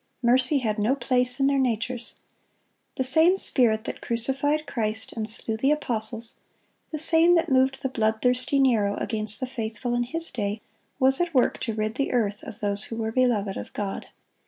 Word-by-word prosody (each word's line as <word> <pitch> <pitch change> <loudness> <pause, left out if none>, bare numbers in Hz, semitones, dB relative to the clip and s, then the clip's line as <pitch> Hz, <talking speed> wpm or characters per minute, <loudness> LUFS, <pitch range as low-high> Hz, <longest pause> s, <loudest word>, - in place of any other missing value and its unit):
Mercy 255 +4 +3
had 220 -5 -1
no 225 +6 +2
place 250 -1 0
in 270 - +3
their 275 0 +2
natures. 240 -1 -2 0.8
The 260 - -1
same 320 +8 +4
spirit 225 - +2
that - - -6
crucified 270 +6 0
Christ 220 -4 -2
and 220 -1 -1
slew 225 0 -2
the 270 +5 +1
apostles, 230 -5 +1 0.6
the 310 - -3
same 325 +3 +5
that 335 - +1
moved 265 0 +2
the - - +1
bloodthirsty 250 +3 +1
Nero 225 -7 +2
against 215 -2 -2
the - - -2
faithful 240 -1 -4
in 240 - +1
his 330 +7 -3
day, 210 -3 -3 0.4
was 265 +3 +3
at 345 -3 -2
work 250 - +2
to 225 -3 -3
rid 215 0 -2
the 275 - -1
earth 210 -4 0
of 210 - -10
those 200 0 -1
who 225 - -6
were 220 -1 -2
beloved 225 -6 +1
of - - -7
God. 200 -2 -4
245 Hz, 180 wpm, -25 LUFS, 220-270 Hz, 0.8 s, same